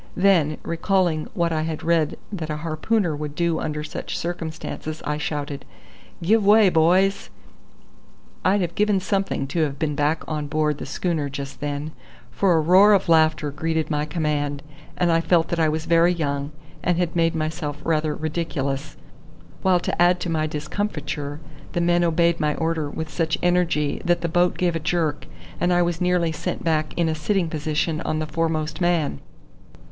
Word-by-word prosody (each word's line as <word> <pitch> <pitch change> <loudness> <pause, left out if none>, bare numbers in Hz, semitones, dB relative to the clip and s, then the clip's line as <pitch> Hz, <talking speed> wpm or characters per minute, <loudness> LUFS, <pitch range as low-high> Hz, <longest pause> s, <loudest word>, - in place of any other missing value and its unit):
Then, 175 -6 +3
recalling 170 -2 0
what 170 -3 +1
I 155 - 0
had 160 -1 -4
read 165 -2 +1
that 170 -6 -4
a 150 - -1
harpooner 165 +3 0
would 150 0 -5
do 170 -1 0
under 150 0 -3
such 150 - -5
circumstances, 160 -2 -5
I 150 0 -1
shouted: 145 -2 -4 0.6
"Give 215 +5 +3
way, 210 0 +6
boys!" 180 +4 +3 1.1
I'd 195 +2 +3
have 175 -1 -2
given 210 -1 +2
something 195 -6 -1
to 165 - -2
have 145 -3 -1
been 150 0 -1
back 145 +2 0
on 150 -2 -3
board 150 -1 0
the - - -6
schooner 160 -6 -1
just 140 0 -7
then, 145 +1 -3 0.4
for 195 -3 +2
a 165 - +4
roar 190 +6 +6
of 195 -4 +2
laughter 155 -2 +3
greeted 160 +2 -2
my 150 0 0
command, 145 -2 -2 0.3
and 175 -1 +2
I 165 0 +3
felt 165 -1 +2
that 170 - -1
I 160 -1 +3
was 160 +1 -2
very 170 +1 +4
young, 145 -4 -2 0.3
and 175 -1 +1
had 175 -1 -1
made 165 -1 +2
myself 155 -2 -3
rather 155 -2 0
ridiculous, 150 -3 -3 0.6
while 185 -2 +3
to - - -2
add 175 +1 +5
to 175 - -2
my 155 -1 0
discomfiture 150 -3 -4 0.3
the - - 0
men 175 0 +3
obeyed 170 0 +2
my 150 -1 +1
order 160 -2 -1
with 160 +1 -5
such 160 -2 0
energy 175 -5 +1
that 175 0 +1
the 170 - 0
boat 175 +2 +2
gave 175 -2 +1
a - - 0
jerk, 160 -2 -1 0.3
and 175 +1 +2
I 175 0 +4
was 170 -1 -2
nearly 180 -2 +2
sent 160 - -4
back 155 -2 0
in 170 -1 +2
a 160 - +1
sitting 170 +3 0
position 155 +1 -1
on 155 - -2
the 155 - -1
foremost 160 +1 -2
man. 170 - +1
160 Hz, 180 wpm, -23 LUFS, 150-175 Hz, 1.1 s, way